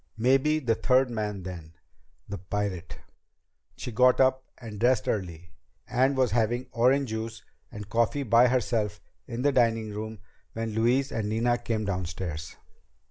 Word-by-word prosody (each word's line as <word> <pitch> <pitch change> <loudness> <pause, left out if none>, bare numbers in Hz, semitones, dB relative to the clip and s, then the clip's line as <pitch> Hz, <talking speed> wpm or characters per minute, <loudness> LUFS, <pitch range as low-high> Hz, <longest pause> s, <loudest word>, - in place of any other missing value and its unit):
Maybe 135 +6 +3
the 125 -7 +1
third 130 +2 +2
man 105 -4 -3
then 85 -3 -8 0.5
the 100 - -6
pirate! 100 -2 -4 0.8
She 125 - -5
got 125 +3 +4
up 130 0 +3
and 110 -4 -9
dressed 125 0 +2
early, 85 -4 -3 0.4
and 130 +2 +2
was 130 -5 +2
having 120 +2 +1
orange 130 +3 +2
juice 110 0 -5 0.3
and 105 -3 -8
coffee 115 +6 +1
by 115 +1 +5
herself 115 -4 0 0.3
in 120 0 -4
the 145 - +4
dining 115 -4 +2
room 110 +1 -5 0.4
when 115 0 -3
Louise 125 +5 +2
and 105 -2 -2
Nina 120 +2 +1
came 115 -2 -2
downstairs. 90 -4 -4
115 Hz, 145 wpm, -27 LUFS, 105-125 Hz, 0.8 s, by